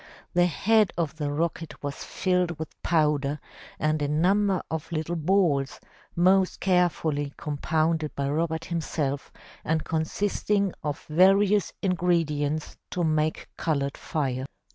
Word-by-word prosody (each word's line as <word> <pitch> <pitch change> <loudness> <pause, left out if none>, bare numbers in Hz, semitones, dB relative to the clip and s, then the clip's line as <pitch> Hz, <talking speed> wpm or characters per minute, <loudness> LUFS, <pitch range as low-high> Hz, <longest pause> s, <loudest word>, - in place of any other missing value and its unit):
The 175 0 +4
head 210 +4 +3
of 160 -2 -2
the 145 -2 -2
rocket 165 +1 -3
was 140 -1 -4
filled 180 -3 0
with 160 - -8
powder 150 -3 +1 0.4
and 155 0 0
a 145 - +1
number 185 +5 +2
of 160 0 -4
little 165 +1 -2
balls, 160 -5 +1 0.4
most 185 +2 +3
carefully 165 -6 +1
compounded 155 +1 -1
by 140 0 -1
Robert 160 +2 -1
himself 150 -4 -2 0.3
and 160 0 0
consisting 200 +4 0
of 145 0 -4
various 195 +4 +4
ingredients 160 -5 0
to 180 - -1
make 155 -1 0
colored 140 -4 -1
fire. 135 -3 -2
160 Hz, 120 wpm, -26 LUFS, 150-180 Hz, 0.4 s, The